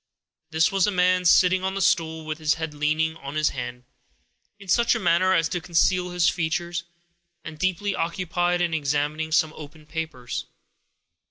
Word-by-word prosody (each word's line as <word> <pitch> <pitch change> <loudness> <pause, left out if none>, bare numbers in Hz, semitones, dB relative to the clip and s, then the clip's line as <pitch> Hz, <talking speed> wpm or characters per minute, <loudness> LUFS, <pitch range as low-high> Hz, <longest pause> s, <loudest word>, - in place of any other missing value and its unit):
This 160 0 +2
was 195 0 +2
a - - +3
man, 180 -1 +2
sitting 185 +2 +5
on 190 0 -2
the - - -2
stool, 165 -5 +1
with 155 0 -5
his 155 -1 +1
head 160 -2 -5
leaning 155 +2 0
on 140 -1 -8
his 155 -1 +2
hand, 125 -1 -6 0.7
in 200 -1 -14
such 235 +6 +3
a - - -1
manner 185 +1 +3
as 165 -2 +2
to 175 - -3
conceal 180 +2 +1
his 175 -1 +1
features, 170 +1 -1 0.6
and 155 -1 -9
deeply 185 +3 0
occupied 175 +1 -1
in 170 -2 0
examining 150 +1 -1
some 160 -1 +2
open 150 +1 -12
papers. 150 -7 -5
165 Hz, 170 wpm, -24 LUFS, 155-180 Hz, 0.7 s, sitting